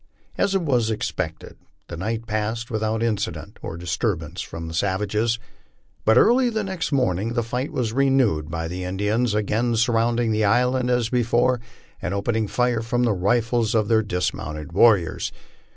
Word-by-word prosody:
As 195 -1 +2
was 130 -10 +1
expected, 95 -6 -4 0.3
the 85 - -6
night 110 +6 -3
passed 110 +2 -2
without 110 0 -1
incident 110 -3 -3
or 80 - -6
di&turbance 85 -1 -2
from 85 0 -7
the 80 - -7
savages; 105 +5 0 0.7
but 110 +2 +5
early 245 - +5
the 220 -2 -1
next 190 -5 -3
morning 115 -5 +1
the 120 -1 0
fight 125 +5 -3
was 115 -4 -2
renewed 130 - +2
by 80 0 -3
the 90 +2 -5
Indians 105 +5 0
again 110 +3 0
surrounding 115 0 +2
the 110 0 +1
island 125 +4 +2
as 120 -2 +1
before, 120 0 +2 0.4
and 90 +3 -2
opening 110 +1 0
fire 125 0 +1
from 120 +2 0
the 115 -3 +2
rifles 115 +4 +1
of 110 -1 +2
their 110 -1 +4
dismounted 85 -5 -3
warriors. 95 -3 +3
110 Hz, 155 wpm, -23 LUFS, 100-120 Hz, 0.7 s, but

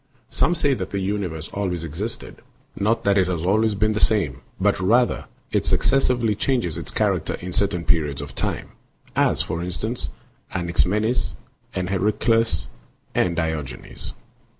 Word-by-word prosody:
Some 175 - +3
say 145 -4 +3
that 95 -7 -3
the 100 - -3
universe 95 -5 -2
always 90 -4 -2
existed, 85 +9 -5 0.4
not 110 +3 +1
that 100 0 +4
it 95 - +3
has 85 -3 -1
always 105 +3 +3
been 110 +2 +2
the 105 - -1
same, 90 - +2 0.2
but - - +3
rather 120 +7 +3 0.3
that - - +3
it - - 0
successively 125 -5 +3
changes 110 - 0
its - - -6
character - - +1
_ - - -4
in 90 0 -6
certain 95 -4 0
periods 75 -4 +1
of 70 -1 -6
time; - - -2 0.5
as, - - +4
for 85 - -3
instance, 105 +7 -3 0.5
Anaxi 85 -1 +2
menes 110 +6 0 0.4
and 90 -1 -1
Herakleitos 105 +4 +2 0.5
and 85 -1 +2
Diogenes. 80 -6 -4
95 Hz, 155 wpm, -23 LUFS, 85-110 Hz, 0.5 s, that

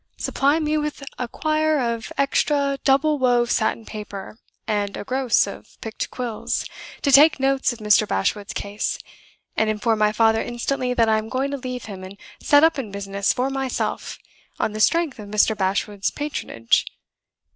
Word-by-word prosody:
Supply 280 +3 +1
me 305 -1 0
with 300 -1 -4 0.2
a 250 - -2
quire 310 +3 +1
of 235 -2 -2
extra 280 0 +1
double 290 +2 +3
wove 245 -2 +2
satin 220 0 0
paper, 210 0 -8 0.3
and 205 -2 -1
a - - -5
gross 255 +1 +2
of - - -11
picked 225 0 -5
quills, 240 -3 -3 0.4
to 280 - +2
take 290 +2 +7
notes 270 0 +2
of 240 - -7
Mr. 210 -1 +3
Bashwood's 200 - -1
case; 205 +1 -3 0.6
and 220 - +2
inform 215 +1 0
my 210 0 +3
father 225 0 +3
instantly 250 +1 -2
that 230 -2 +3
I 220 0 +3
am 215 +1 -7
going 265 +3 -1
to 280 - -2
leave 250 -2 -6
him 195 -3 -8
and 190 +2 -10 0.2
set 290 +1 +5
up 325 -3 +4
in 235 -6 -4
business 200 0 -1
for 260 +2 -1
myself, 270 -1 -3 0.4
on 215 - 0
the 215 - -5
strength 330 +2 +2
of 205 -1 -9
Mr. 215 +1 +3
Bashwood's 195 +1 -1
patronage. 280 - 0
240 Hz, 170 wpm, -22 LUFS, 210-275 Hz, 0.6 s, take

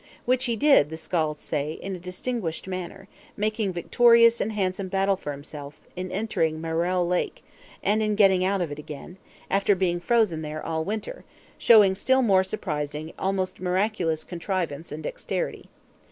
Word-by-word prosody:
Which 255 +1 +2
he 235 -2 0
did, 275 - +5
the 160 - -6
Skalds 155 -2 -2
say, 150 0 -2
in 195 +3 -6
a - - -8
distinguished 180 0 -4
manner; 185 +1 -6 0.3
making 215 -1 0
victorious 230 +6 +5
and 220 - -1
handsome 190 -2 -2
battle 195 +1 +1
for 150 -5 -6
himself, 145 0 -9 0.2
in 185 0 -4
entering 175 -7 -1
Maelare 170 +2 0
Lake; 180 0 -1 0.4
and 215 +2 +2
in 215 -1 +1
getting 195 -3 +4
out 195 0 +1
of 165 -4 -2
it 145 - -6
again, 150 +4 -9 0.3
after 200 +1 +3
being 175 -2 0
frozen 195 -4 +2
there 155 0 -5
all 160 -1 -1
winter, 215 - -5 0.4
showing 210 -5 +7
still 260 +7 +2
more 190 -5 +4
surprising, 155 -6 -4
almost 190 -1 -1
miraculous 180 -3 0
contrivance 170 -4 -4
and 155 +1 -6
dexterity. - - -4
185 Hz, 160 wpm, -25 LUFS, 160-210 Hz, 0.4 s, showing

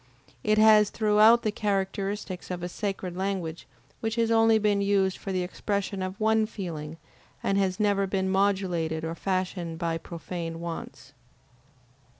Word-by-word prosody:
It 215 0 +2
has 215 -1 +6
throughout 215 +2 +5
the 215 - +1
characteristics 195 -2 -2
of 180 -1 -4
a 175 - -3
sacred 190 -2 -4
language 185 -4 -3 0.3
which 225 0 -2
has 230 -1 +1
only 225 0 +5
been 205 -2 +2
used 195 -2 +1
for 195 - -5
the 185 -1 0
expression 200 +2 -3
of 185 +1 -4
one 220 0 +3
feeling 165 -7 -6 0.5
and 195 - +1
has 190 0 0
never 200 -2 +2
been 190 0 -1
modulated 190 -5 0
or 165 0 -3
fashioned 180 -2 -2
by 165 -1 -2
profane 165 0 -6
wants. 165 -4 -7
195 Hz, 150 wpm, -27 LUFS, 175-210 Hz, 0.5 s, has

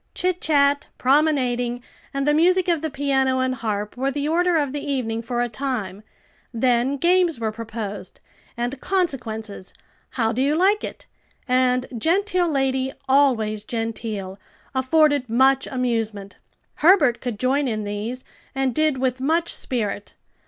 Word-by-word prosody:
Chit 365 0 -1
chat, 285 -2 +2
promenading 250 -4 +1 0.3
and 275 0 -2
the 295 - +4
music 360 +4 +3
of 335 -4 +1
the 320 - -2
piano 270 -2 +1
and 260 0 +1
harp 210 -4 -3
were 265 +2 -1
the 285 +1 -2
order 350 +2 +2
of 290 -3 0
the 290 +1 -4
evening 250 -6 -2
for 240 +1 -1
a - - -1
time; 220 -6 -4 0.5
then 245 +3 +1
games 345 -2 +2
were 220 -1 -1
proposed, 215 -3 -6 0.4
and 245 +3 -3
"Consequences," 225 - -3 0.4
"How 225 -3 0
do 245 +3 -1
you 285 +3 +2
like 390 +5 +3
it?" - - -7 0.4
and 255 0 +2
"Genteel 365 - +1
lady, 265 -2 0 0.2
always 240 -6 +2
genteel," 215 -4 -4 0.3
afforded 280 0 +2
much 265 +4 +3
amusement. 225 -6 -2 0.4
Herbert 305 -8 +4
could 245 -4 -4
join 270 +4 +1
in 215 -3 -2
these, 210 +5 -4 0.3
and 270 -2 0
did 310 0 +1
with 255 0 -1
much 325 +5 +1
spirit. 210 -4 -2
260 Hz, 145 wpm, -22 LUFS, 230-290 Hz, 0.5 s, the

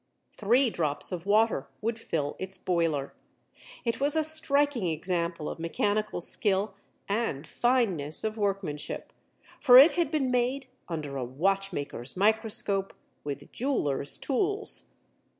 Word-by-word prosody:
Three 240 +4 +2
drops 150 -3 -1
of 180 +1 -5
water 220 +2 +2
would 225 +1 -2
fill 150 -9 -2
its 190 0 -6
boiler. 165 -6 -1 0.7
It 230 +2 -1
was 285 +2 +3
a 315 - +2
striking 290 - +3
example 170 0 -2
of - - -6
mechanical 205 +4 -1
skill 195 +3 +1 0.3
and 200 -9 -1
fineness 195 - 0
of 220 0 -2
workmanship, 195 -8 -3 0.5
for 250 -2 +8
it 280 +6 +9
had 345 -4 0
been 285 -5 0
made 250 +2 0 0.2
under 150 -5 -4
a 130 - -2
watchmaker's 150 -1 -2
microscope 205 -1 +1 0.3
with 145 -1 -6
jeweler's 145 - 0
tools. 400 +9 -1
200 Hz, 125 wpm, -28 LUFS, 165-245 Hz, 0.7 s, it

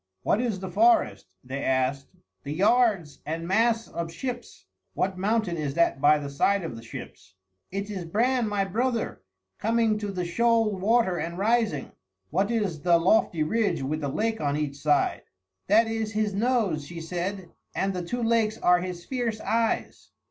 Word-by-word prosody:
"What 215 - +2
is 230 -6 -1
the 190 -1 -5
forest?" 345 - +3 0.2
they 135 +2 -5
asked. 130 +1 0 0.3
"The 140 - -6
yards 200 - +2
and 165 +2 -4
masts 225 +4 +2
of 170 -1 -5
ships." 245 +8 -6 0.3
"What 190 0 0
mountain 200 -2 0
is 145 -3 -3
that 170 -5 +2
by 150 +1 +6
the 145 -1 -5
side 185 +8 +1
of 160 -8 -5
the 115 - -9
ships?" 115 -4 -10 0.3
"It 200 +2 -4
is 185 -4 -5
Bran 235 +7 +1
my 200 -1 0
brother, 230 +4 -1 0.4
coming 225 -1 +1
to 210 - -3
the 180 -2 -3
shoal 225 +3 +2
water 195 -2 +2
and 170 +2 -4
rising." 215 - +1 0.4
"What 195 +6 +1
is 205 -10 -1
the 170 +1 +4
lofty 170 -2 +2
ridge 175 -4 0
with 155 +4 -2
the 145 - -2
lake 220 +8 -1
on 145 -1 0
each 145 -2 -3
side?" 145 0 +1 0.5
"That 220 +4 +5
is 225 -1 -3
his 210 -1 0
nose," 205 - 0
she 170 -1 -7
said, 175 +2 -4 0.2
"and 195 0 0
the 180 - -3
two 240 +8 -3
lakes 225 -1 +2
are 180 0 +4
his 180 -1 -6
fierce 240 -4 -2
eyes." 225 +1 -1
195 Hz, 175 wpm, -26 LUFS, 165-225 Hz, 0.5 s, by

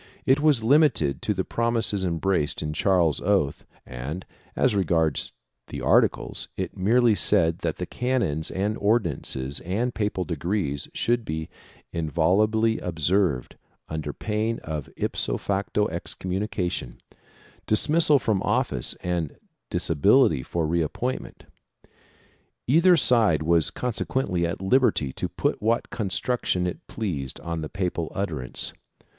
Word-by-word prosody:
It 130 +2 +4
was 145 -6 +3
limited 125 - +3
to 105 - 0
the 95 - 0
promises 115 -4 0
embraced 85 -3 0
in 75 0 -3
Charles's 85 -3 +2
oath 95 -8 0 0.2
and, 65 +9 -6 0.3
as 130 - +2
regards 80 -6 +1 0.4
the - - -6
articles, - - +2
it 95 -2 -4
merely 115 +4 +3
said 85 -4 +2
that 80 -2 -2
the 90 - -3
canons 120 - -1
and 100 +3 -1
ordinances 75 - 0
and 115 +8 -2
papal 105 -4 -1
decrees 85 -3 -2
should 120 0 +1
be 80 -5 -4 0.4
inviolably 100 +8 +2
observed, 85 -3 0 0.3
under 80 -2 -3
pain 110 +6 -2
of 75 -3 -5
ipso - - -1
facto 100 +1 -1
excom 95 - -6
munication, 95 - -2 0.7
dismissal 150 +7 +4
from 110 -6 0
office - - 0
and 85 -4 -2 0.3
disability 80 - +3
for 80 +5 -2
re 85 +2 +1
appoint 125 - -2
ment. - - -13 1.2
Either 170 +7 +5
side 110 - +4
was 85 0 +4
consequently 115 -7 -1
at 85 +3 -5
liberty 95 - +2
to - - -3
put - - -1
what 115 +2 0
con 110 -5 -3
struction 95 -4 0
it 90 - -5
pleased 75 - -4
on 85 -1 -4
the 75 - -5
papal 90 -4 -3
utterance. 80 -11 -2
95 Hz, 130 wpm, -25 LUFS, 80-110 Hz, 1.2 s, Either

